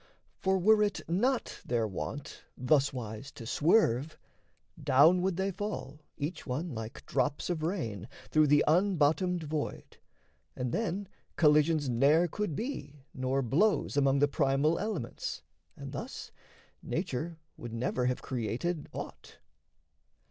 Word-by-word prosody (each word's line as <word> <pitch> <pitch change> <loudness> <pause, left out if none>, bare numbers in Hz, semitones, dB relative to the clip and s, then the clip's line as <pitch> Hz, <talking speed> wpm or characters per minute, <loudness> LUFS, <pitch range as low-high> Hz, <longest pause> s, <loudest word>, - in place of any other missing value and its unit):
For 190 0 +2
were 210 +4 +5
it 205 -2 -1
not 235 +9 0
their 115 -2 0
wont 135 +8 -6
Thuswise 130 -3 0
to 115 - -8
swerve, 150 - +2 0.7
down 155 +6 +6
would 185 -1 0
they 190 +1 0
fall, 185 -7 -5 0.2
each 150 +2 -4
one, 145 +5 -3
Like 110 +1 -7
drops 145 +4 0
of 165 -3 -2
rain, 115 - -3 0.2
through 155 -1 +5
the 145 +1 +5
unbottomed 175 0 +2
void; 150 -1 -4 0.6
And 125 -1 -2
then 200 - -2 0.3
collisions 150 -1 +4
ne'er 140 +8 +4
could 175 -2 -3
be 145 - -5
nor 130 +1 0
blows 165 - +2
Among 140 -1 +3
the 145 +1 +4
primal 140 +3 +2
elements; 200 - -4 0.3
and - - -7
thus - - -6 0.5
Nature 165 -1 -3 0.2
would 120 - -8
never 125 +2 -1
have 125 - -1
created 130 +7 -2
aught. - - -8
150 Hz, 125 wpm, -31 LUFS, 130-180 Hz, 0.7 s, down